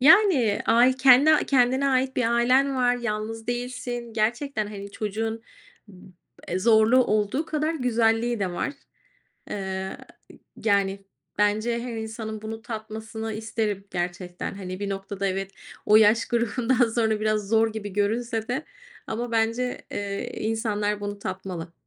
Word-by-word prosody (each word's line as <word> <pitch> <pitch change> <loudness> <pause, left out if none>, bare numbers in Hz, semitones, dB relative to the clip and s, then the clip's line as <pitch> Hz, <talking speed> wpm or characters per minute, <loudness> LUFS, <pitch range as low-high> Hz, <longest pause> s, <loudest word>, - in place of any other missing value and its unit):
Yani, 290 - +5
ay 240 +3 +5
kendi 275 +4 +6
kendine 260 +1 +3
ait 260 0 +1
bir 250 - +2
ailen 260 +3 +3
var, 245 -1 +3
yalnız 225 -1 -4
değilsin. 245 -1 -4
Gerçekten 230 +1 -1
hani, 200 -1 -8
çocuğun 220 +2 -3 0.5
b 185 -2 -15 0.4
eee, 180 - -1
zorluğu 225 +4 +5
olduğu 215 +9 0
kadar 310 +1 -1
güzelliği 235 -3 +1
de 190 -2 0
var, 175 - -2 0.8
eee, - - -3
y 190 -1 -4 0.7
yani, 200 -2 +1 0.3
bence 215 +3 +1
her 240 -2 -5
insanın 220 -1 -5
bunu 220 +1 -6
tatmasını 220 -1 -6
isterim 215 -2 -2
gerçekten. 175 0 -4
Hani, 185 -1 -7
bir 200 - -2
noktada 195 0 -3
evet, 195 0 -2 0.4
o 210 - +7
yaş 220 +1 +5
grubundan 240 +1 +1
sonra 220 -2 +1
biraz 215 -2 0
zor 225 0 +3
gibi 205 -2 -6
görünse 225 +3 -1
de 265 +5 -2 0.4
ama 235 +2 -3
bence, 230 +2 0
eee, 200 -1 -4
insanlar 210 -2 -1
bunu 205 0 -4
tatmalı 185 -3 -6
220 Hz, 135 wpm, -25 LUFS, 205-245 Hz, 0.8 s, o